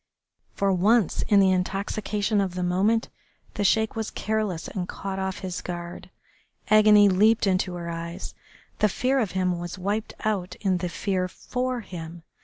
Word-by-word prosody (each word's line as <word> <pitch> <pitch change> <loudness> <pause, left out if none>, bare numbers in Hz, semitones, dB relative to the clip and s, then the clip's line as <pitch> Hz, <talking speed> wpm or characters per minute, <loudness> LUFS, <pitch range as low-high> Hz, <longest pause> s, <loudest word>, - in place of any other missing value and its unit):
For 195 -1 +2
once, 205 +2 +3
in 205 - +5
the 190 -1 +5
intoxication 200 +3 -1
of 185 -2 -2
the 180 - -2
moment, 195 +6 +1 0.4
the 205 - -2
Sheik 220 +2 +2
was 220 -1 -2
careless 215 -6 -2
and 180 -3 -4
caught 195 -1 -5
off 190 0 -3
his 185 -1 -4
guard. 175 0 -7 0.6
Agony 210 -1 +7
leaped 210 +4 +4
into 185 -1 0
her 170 -1 -6
eyes. 170 0 -6 0.5
The 210 - +4
fear 260 +7 +1
of 215 -7 -1
him 180 -2 0
was 175 +2 -6
wiped 205 +4 -2
out 190 -4 -1
in 190 -3 0
the 180 0 -3
fear 185 0 -1
for 250 +6 -3
him. 170 -4 -8
195 Hz, 165 wpm, -25 LUFS, 180-215 Hz, 0.6 s, Agony